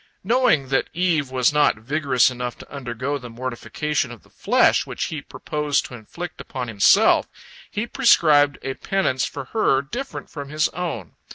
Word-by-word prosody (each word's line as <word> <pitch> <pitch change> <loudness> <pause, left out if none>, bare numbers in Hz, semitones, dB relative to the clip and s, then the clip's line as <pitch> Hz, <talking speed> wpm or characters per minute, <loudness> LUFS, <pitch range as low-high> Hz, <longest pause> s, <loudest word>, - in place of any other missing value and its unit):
Knowing 195 - +2
that 135 - +1
Eve 165 -6 +1
was 130 +1 +2
not 150 -5 +3
vigorous 130 +1 +2
enough 125 -1 -5
to - - -14
undergo 135 +1 -3
the 125 -2 -9
mortification 130 +3 -3
of 120 - -12
the - - -24
flesh - - +3
which - - -5
he - - -4
purposed 150 -1 -2
to - - -10
inflict 155 +10 -8
upon 130 -3 -5
himself, 105 -4 +4 0.4
he 210 +3 -3
prescribed 155 - +4
a 135 - -2
penance 130 -7 0
for 140 -2 -6
her 140 -11 +2
different 250 - -6
from 145 -2 -8
his 155 +1 +1
own. 155 - -5
140 Hz, 165 wpm, -22 LUFS, 125-160 Hz, 0.4 s, himself